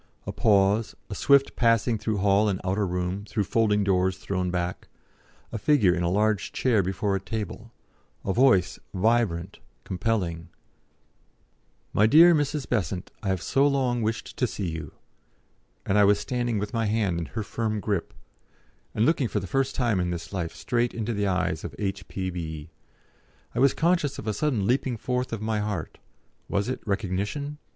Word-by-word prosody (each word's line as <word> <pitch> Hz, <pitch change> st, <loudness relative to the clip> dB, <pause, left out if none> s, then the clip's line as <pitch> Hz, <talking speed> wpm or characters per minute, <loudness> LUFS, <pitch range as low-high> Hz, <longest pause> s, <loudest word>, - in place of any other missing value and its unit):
A -, -, -3 dB
pause, 105 Hz, +1 st, +2 dB, 0.2 s
a -, -, -1 dB
swift 140 Hz, +6 st, +3 dB
passing 115 Hz, -1 st, +2 dB
through 110 Hz, 0 st, -1 dB
hall 100 Hz, +2 st, +3 dB
and 95 Hz, -2 st, -1 dB
outer 95 Hz, +2 st, 0 dB
room, 90 Hz, +2 st, -2 dB
through 105 Hz, 0 st, -2 dB
folding 105 Hz, +1 st, +2 dB
doors 95 Hz, -1 st, +1 dB
thrown 95 Hz, -1 st, -2 dB
back, 90 Hz, 0 st, -3 dB, 0.6 s
a 115 Hz, -, -4 dB
figure 110 Hz, -8 st, +4 dB
in 90 Hz, -, -1 dB
a 85 Hz, -, +1 dB
large 105 Hz, +2 st, +1 dB
chair 120 Hz, -6 st, +2 dB
before 95 Hz, +2 st, -1 dB
a -, -, 0 dB
table, 110 Hz, +3 st, -6 dB, 0.5 s
a 95 Hz, -, 0 dB
voice, 115 Hz, -7 st, +3 dB, 0.2 s
vibrant, 100 Hz, -4 st, +1 dB, 0.2 s
compelling, 90 Hz, -4 st, -2 dB, 1.4 s
"My 105 Hz, -, +4 dB
dear 165 Hz, +7 st, +8 dB
Mrs. 145 Hz, -2 st, 0 dB
Besant, 95 Hz, -5 st, -2 dB
I 105 Hz, -, -5 dB
have 95 Hz, -3 st, 0 dB
so 140 Hz, +1 st, +3 dB
long 130 Hz, -4 st, +1 dB
wished 110 Hz, +1 st, -3 dB
to 125 Hz, -, +1 dB
see 95 Hz, -6 st, -4 dB
you," 80 Hz, -3 st, -7 dB, 0.9 s
and 100 Hz, +2 st, +2 dB
I -, -, +7 dB
was 100 Hz, 0 st, +5 dB
standing 120 Hz, -3 st, -1 dB
with 105 Hz, +3 st, -3 dB
my 115 Hz, -2 st, 0 dB
hand 105 Hz, -5 st, 0 dB
in 85 Hz, -, -3 dB
her 110 Hz, -, 0 dB
firm 110 Hz, 0 st, -2 dB
grip, 100 Hz, -4 st, -2 dB, 0.8 s
and 110 Hz, -, +3 dB
looking 145 Hz, -4 st, +2 dB
for 105 Hz, -, -1 dB
the 95 Hz, -, -6 dB
first 135 Hz, +8 st, 0 dB
time 120 Hz, -7 st, +1 dB
in 90 Hz, 0 st, 0 dB
this 85 Hz, +2 st, -5 dB
life 85 Hz, -4 st, -3 dB
straight 120 Hz, 0 st, -1 dB
into 115 Hz, 0 st, -2 dB
the 100 Hz, -1 st, 0 dB
eyes 90 Hz, -4 st, -1 dB
of 80 Hz, -4 st, -6 dB
"H.P.B." 90 Hz, -6 st, -4 dB, 0.8 s
I 120 Hz, -, -2 dB
was 135 Hz, +1 st, +4 dB
conscious 165 Hz, -4 st, +1 dB
of -, -, -7 dB
a 110 Hz, -, -1 dB
sudden 120 Hz, -4 st, 0 dB
leaping 125 Hz, +1 st, +1 dB
forth 125 Hz, +3 st, -2 dB
of 110 Hz, -2 st, -4 dB
my 110 Hz, -1 st, 0 dB
heart 105 Hz, -6 st, -4 dB, 0.5 s
was 100 Hz, +4 st, 0 dB
it 130 Hz, -, -3 dB
recognition? 105 Hz, +9 st, -2 dB
105 Hz, 175 wpm, -26 LUFS, 95-120 Hz, 1.4 s, dear